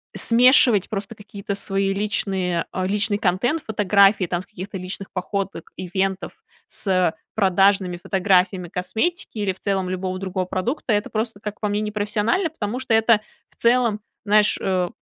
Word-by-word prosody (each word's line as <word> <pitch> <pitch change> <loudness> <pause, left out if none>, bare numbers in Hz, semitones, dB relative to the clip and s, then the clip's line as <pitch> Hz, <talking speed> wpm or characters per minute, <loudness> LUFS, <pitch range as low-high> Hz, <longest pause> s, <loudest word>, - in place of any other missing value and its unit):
смешивать 240 -3 +5
просто 210 +1 -5
какие-то 205 -1 -6
свои 195 0 0
личные 190 -4 -1
о 185 - -2
личный 205 +1 +1
контент, 225 - 0
фотографии 200 -2 +3
там 175 0 -2
с - - -15
каких-то 195 0 -7
личных 185 +1 -5
походок, 195 +1 -4
ивентов 190 +1 -2 0.3
с, - - -2
э, 185 -3 +2 0.2
продажными 195 -2 +3
фотографиями 185 -1 +1
косметики 220 - -2
или 205 -3 -1
в 185 - -20
целом 195 -2 -1
любого 185 0 -3
другого 185 -1 -3
продукта- 225 - -2
это 205 +1 0
просто, 220 -1 -3
как 210 0 -7
по 210 - 0
мне, 205 +1 0
непрофессионально. 210 - 0
Потому 245 -6 -4
что 260 -3 -1
это 225 -1 +4 0.3
в - - -25
целом, 235 -3 +2 0.2
знаешь, 210 0 +4
э, 185 -2 0
200 Hz, 155 wpm, -22 LUFS, 185-215 Hz, 0.3 s, смешивать